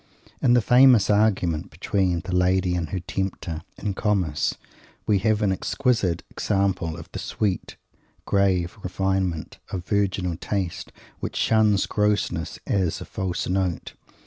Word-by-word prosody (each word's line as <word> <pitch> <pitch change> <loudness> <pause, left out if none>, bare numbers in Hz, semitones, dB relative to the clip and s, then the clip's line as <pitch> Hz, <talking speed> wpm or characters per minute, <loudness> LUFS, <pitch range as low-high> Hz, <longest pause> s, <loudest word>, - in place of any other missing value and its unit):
In 120 - +4
the 120 -2 +4
famous 125 -4 +6
argument 95 -6 +2
between 90 +2 0
the 90 -1 -6
Lady 90 0 +2
and 85 -4 -2
her 95 - -2
Tempter, 90 -3 -4 0.2
in 100 -1 -2
Comus, 95 -7 0 0.5
we 105 -2 +3
have 110 +1 +1
an 100 - +3
exquisite 105 - 0
example 95 -5 0
of 75 - -9
the - - -5
sweet, 100 -4 -2 0.5
grave 95 -2 +1
refinement 95 -3 -2
of 90 -2 -4
virginal 95 -4 0
taste 95 -1 -3 0.3
which - - -5
shuns 110 -3 +3
grossness 105 -1 0
as 95 -5 0
"a - - -7
false 95 -2 -3
note." 90 -2 -1
95 Hz, 135 wpm, -24 LUFS, 90-105 Hz, 0.5 s, famous